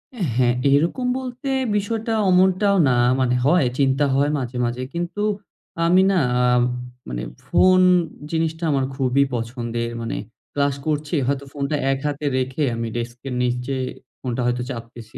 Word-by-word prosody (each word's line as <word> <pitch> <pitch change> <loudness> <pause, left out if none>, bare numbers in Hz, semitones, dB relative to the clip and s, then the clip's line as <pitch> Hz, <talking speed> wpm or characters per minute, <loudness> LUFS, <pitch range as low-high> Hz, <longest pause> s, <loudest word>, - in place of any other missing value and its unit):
অ্যা 205 - -3
হ্যাঁ, 120 -1 +3 0.2
এরকম 170 - +1
বলতে 255 +1 -6 0.3
বিষয়টা 225 +2 -2 0.2
অমনটাও 190 +2 +4
না। 125 - +3 0.2
মানে 125 -1 +2
হয়, 165 -2 +4
চিন্তা 135 +1 +3
হয় 145 +2 +2
মাঝে, 125 -1 -4
মাঝে। 120 +2 -3
কিন্তু 175 +4 -3 0.6
আমি 180 +3 +5
না, 185 - +3 0.2
আ - - +3 0.7
মানে - - -4 0.2
ফোন 185 0 +5 0.5
জিনিসটা 160 +1 -1
আমার 135 -1 +1
খুবই 135 +1 +2
পছন্দের। 115 0 -3
মানে 115 - -3 0.4
ক্লাস 140 -1 +1
করছি, 150 +1 -1
হয়তো 140 0 -1
ফোনটা 140 +1 -2 0.2
এক 135 - -1
হাতে 145 0 -3
রেখে 130 +3 -1
আমি 115 0 -3
ডেস্কের 120 +2 -5
নিচে 125 +2 -1 0.4
ফোনটা 125 -1 -3
হয়তো 125 0 0
চাপতেছি, 115 -2 -8
140 Hz, 145 wpm, -22 LUFS, 125-170 Hz, 0.7 s, আমি